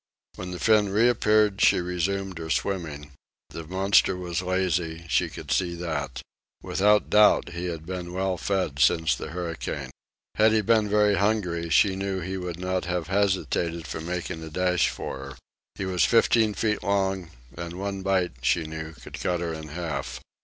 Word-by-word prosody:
When 90 - -6
the 90 - -5
fin 105 0 +3
reappeared 105 -1 +3
she - - +5
resumed 90 +1 -2
her 80 -1 -6
swimming. 80 -6 -2 0.4
The 80 -1 -7
monster 95 +1 +3
was 90 -2 -3
lazy 90 -3 -1
she - - +1
could - - -8
see 90 -2 +1
that. 75 -6 -4 0.4
Without 105 +2 +2
doubt 105 0 +5
he 85 +1 -5
had 80 -3 -5
been 90 0 -5
well 95 +1 -1
fed 90 -6 -2
since 80 +3 +4
the 65 - -5
hurricane. 85 -1 -5 0.4
Had 110 0 +4
he 110 - +3
been 110 0 +2
very 105 -1 +3
hungry, 90 -5 0
she 95 +4 +4
knew 95 0 -2
he 95 +2 -4
would 90 -2 -5
not 90 0 -2
have 90 -2 -2
hesitated 90 -4 0
from 80 +2 -6
making 90 -1 -4
a 80 - -7
dash 90 +2 +1
for - - -5
her. 70 0 -9 0.4
He 95 - -4
was 90 -4 +1
fifteen 115 +1 +3
feet 105 +2 0
long, 95 -3 0 0.3
and 85 0 -6
one 100 +1 -4
bite, 95 -2 +1
she 85 +6 +2
knew, 80 0 -6
could - - -10
cut 90 -1 0
her 85 -1 -3
in 80 -1 -7
half. 80 +1 -4
90 Hz, 175 wpm, -26 LUFS, 85-100 Hz, 0.4 s, she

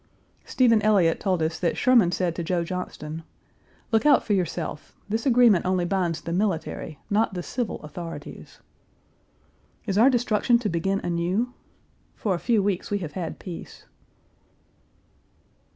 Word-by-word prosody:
Stephen 230 -4 +3
Elliott 195 -6 +3
told 185 -5 0
us 160 0 -2
that 170 - 0
Sherman 235 -9 +4
said 180 -2 0
to 170 - -3
Joe 170 0 0
Johnston, 165 -3 -5 0.7
"Look 225 -1 +3
out 295 -1 +5
for 210 - 0
yourself. 170 -5 -3
This 220 +5 -1
agreement 240 -7 +5
only 185 -1 +1
binds 175 -3 -1
the 170 - -4
military, 170 -5 -2
not 210 -1 +1
the 175 - -3
civil, 245 +2 -3
authorities." 165 +3 -9 1.2
Is 200 -2 0
our 245 +4 +7
destruction 240 -1 +2
to 230 -3 -2
begin 195 +4 -1
anew? 180 +8 -1 0.6
For 205 - -1
a 175 - -2
few 225 -2 +2
weeks 195 -2 -1
we 205 - 0
have 165 -6 -5
had 170 +2 -5
peace. 175 -3 -9
190 Hz, 145 wpm, -25 LUFS, 170-220 Hz, 1.2 s, our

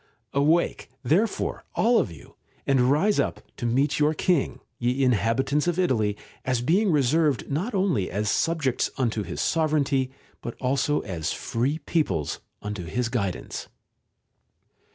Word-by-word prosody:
Awake, 155 +5 +2
therefore, 190 - +1
all 235 +1 +4
of - - -1
you, 80 - -14 0.3
and 130 -2 +3
rise 190 +9 +3
up - - 0 0.2
to 120 - -2
meet 135 +6 +1
your 150 +1 +3
King, 170 -2 +1 0.2
ye 125 +3 +1
inhabitants 130 +6 +2
of 175 -1 +1
Italy, 110 - +1 0.3
as 125 -2 0
being 185 - +3
reserved 150 0 +2
not 190 - -1
only 180 - +1
as 105 +3 -2
subjects 155 -1 +1
unto 115 -4 0
his 95 - -5
sovereignty, 145 -5 +1 0.3
but 120 - -5
also 135 +3 +1
as 85 -6 -3
free 130 +7 -1
peoples 140 - -1 0.2
unto 105 -4 -4
his 120 +8 -1
guidance. 100 -7 -3
135 Hz, 135 wpm, -25 LUFS, 115-160 Hz, 0.3 s, all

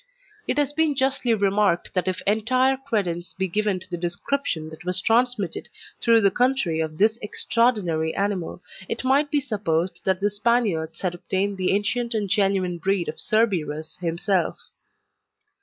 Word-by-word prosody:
It - - -1
has 290 -1 +1
been 315 -1 +1
justly 265 -3 +1
remarked 200 -3 +1
that 180 -1 0
if 185 +1 -2
entire 255 +6 +2
credence 200 -10 -3
be 190 0 -1
given 205 +1 0
to 185 - -10
the 175 -2 -5
description 175 - -2
that 160 - -11
was 180 +1 +1
transmitted 230 -2 +1 0.3
through 230 -1 +5
the 200 -2 +4
country 245 -9 +1
of 155 -1 -3
this 220 +4 +3
extraordinary 205 -8 0
animal, 195 -2 -2 0.3
it - - -3
might 275 +3 +3
be 295 - +2
supposed 195 - -2
that 190 -1 +1
the 205 +1 +1
Spaniards 205 -7 0
had 185 -2 -1
obtained 195 +3 -2
the 185 - +1
ancient 225 +4 0
and 205 -3 -1
genuine 195 -3 +1
breed 190 0 0
of - - -6
Cerberus 160 -8 0
himself. 175 +1 0
200 Hz, 155 wpm, -24 LUFS, 175-235 Hz, 0.3 s, through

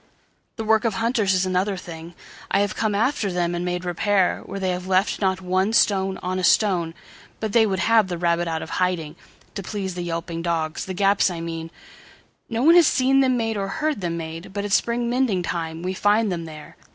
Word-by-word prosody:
The 225 - -4
work 220 0 +3
of 225 -4 0
hunters 225 -4 +1
is 185 +1 +1
another 185 +2 0
thing:I 170 +3 -5
have 205 -1 -1
come 215 -2 0
after 220 -2 0
them 175 -1 -1
and 175 0 -2
made 180 0 -2
repairWhere 190 +2 0
they 190 -1 0
have 180 +1 -4
left 190 +3 +1
not 190 -1 +1
one 190 +3 0
stone 195 -4 +2
on 185 +1 -2
a - - -3
stone, 175 -4 +2 0.4
But 220 -2 -3
they 225 -2 +5
would 190 -2 -1
have 220 +1 +3
the 175 -2 -4
rabbit 170 0 +1
out 160 -1 -2
of - - -9
hiding, 170 -4 -1 0.4
To 200 - -4
please 195 -1 -4
the 175 - -5
yelping 165 -1 -4
dogs. 165 -2 -2
The 185 - -5
gaps 200 +1 +3
I 175 -2 -5
mean, 165 0 -5 0.8
No 230 +1 -1
one 325 +4 +7
has 345 -3 +7
seen 265 +1 +3
them 260 -2 +3
made 225 -2 -1
or 195 -1 -2
heard 300 +3 -2
them 170 -2 -2
made, 165 +2 -7
But 200 0 -3
at 205 - -4
spring 235 +3 +1
mending 240 -7 +1
time 165 -1 -4
we 185 +1 -2
find 205 +2 +2
them 170 -2 -3
there. 155 -2 -11
190 Hz, 210 wpm, -23 LUFS, 175-215 Hz, 0.8 s, one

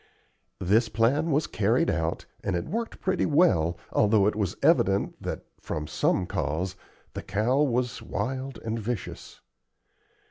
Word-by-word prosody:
This 110 +6 +3
plan 130 +9 +2
was 150 +1 +2
carried 115 +10 +1
out, 80 0 -2 0.2
and 95 - -1
it 85 - -2
worked 230 +2 -4
pretty 190 -1 +1
well, 95 - +3 0.2
although 105 -1 +4
it 105 - +2
was 100 -5 -2
evident 100 +1 +3
that, - - -5
from 75 -1 -4
some 90 - +1
cause, 85 +3 -2 0.4
the - - -5
cow 110 +8 +1
was 125 -3 0
wild 130 +5 -3
and 115 +1 -2
vicious. 115 -1 -5
110 Hz, 140 wpm, -27 LUFS, 95-135 Hz, 0.4 s, although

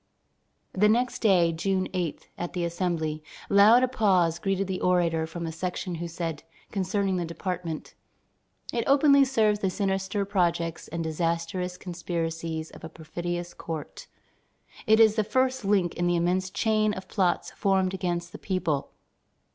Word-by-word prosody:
The 210 +3 +4
next 245 +3 +1
day, 180 -6 +4
June 185 +3 0
8, 175 -5 -3
at 175 - -5
the 175 -1 -1
Assembly, 170 -3 -2 0.3
loud 215 +5 +7
applause 190 -9 +2
greeted 195 0 0
the 185 -1 -4
orator 170 -3 +2
from 170 +1 -6
a 165 - -3
section 180 +2 -4
who 170 - -3
said, 165 -2 -4 0.3
concerning 195 -1 0
the 175 - -1
department: 170 -1 -5 0.8
"It 235 - 0
openly 280 0 +6
serves 220 -6 +2
the 195 - 0
sinister 195 +1 -1
projects 170 -4 0
and 165 0 -4
disastrous 170 +3 -2
conspiracies 165 -2 -4
of - - -14
a 160 - -6
perfidious 175 +2 -5
court. 160 -3 -7 0.8
It 220 +1 +5
is 220 -1 +6
the 215 - +3
first 260 +4 0
link 195 -4 +2
in 175 - -1
the 175 - +2
immense 180 +2 +1
chain 215 +1 +1
of 185 - -8
plots 185 -4 0
formed 190 -2 +1
against 175 -2 -2
the - - -9
people. 175 -7 -1
180 Hz, 150 wpm, -27 LUFS, 170-200 Hz, 0.8 s, loud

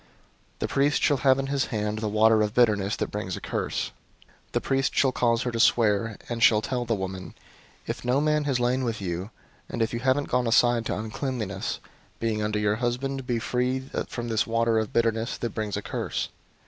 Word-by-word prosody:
The - - -2
priest 145 +2 +2
shall 145 - +4
have 130 0 +4
in 135 - -1
his 140 0 0
hand 105 -2 -2
the 110 - -2
water 110 +1 +4
of 105 +2 -1
bitterness 105 -4 +3
that - - -3
brings 100 -3 -3
a - - -6
curse. - - -2 0.6
005:019 - - -34
The - - +1
priest 135 -1 0
shall 135 -1 +4
cause 115 -1 +1
her 125 - -1
to 115 - -3
swear, 110 -1 +3
and 120 -1 -4
shall 110 -1 +6
tell 125 0 -2
the 115 -1 +1
woman, 95 -1 -5 0.5
'If - - -4
no 125 +3 +2
man 150 0 +1
has 135 -4 +1
lain 125 +2 +1
with 115 -3 -2
you, 90 +1 -3 0.4
and - - -4
if 115 +1 0
you 115 - -1
haven't 130 +3 +1
gone 125 -1 +1
aside 120 0 +3
to - - -1
uncleanness, 110 -3 -3 0.4
being 110 -2 -1
under 105 0 0
your 105 0 +1
husband, 125 +2 -2
be 120 -3 +1
free 125 +3 0 0.3
from 120 -1 -5
this 115 +1 +1
water 115 0 +2
of 110 - -3
bitterness 115 0 0
that 120 - -3
brings 105 -2 -2
a 105 - -4
curse. - - -3
115 Hz, 210 wpm, -26 LUFS, 105-125 Hz, 0.6 s, shall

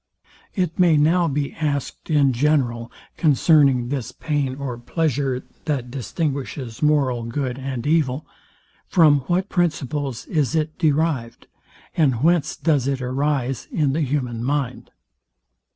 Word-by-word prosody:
It 180 -5 -1
may 170 -4 +5
now 165 +4 +3
be 145 -1 -2
asked 145 -2 -3
in 145 -4 +3
general, 120 -4 +1 0.3
concerning 140 -5 +4
this 130 -3 -3
pain 140 -2 -2
or 135 -3 -4
pleasure, 135 -2 -1 0.2
that 130 -6 -2
distinguishes 135 -3 -4
moral 140 -5 +2
good 125 +2 -3
and 130 -3 -4
evil, 150 -2 +1 0.6
FROM 155 -6 +5
WHAT 185 +2 +1
PRINCIPLES 145 -7 -1
IS 155 -2 0
IT 155 0 -1
DERIVED, 150 -6 0 0.5
AND 135 -6 +2
WHENCE 170 -2 +2
DOES 145 -4 +1
IT 135 -1 0
ARISE 135 -1 -1
IN 145 -4 +1
THE 160 - 0
HUMAN 125 -5 -2
MIND? 135 -1 -2
140 Hz, 125 wpm, -22 LUFS, 130-155 Hz, 0.6 s, may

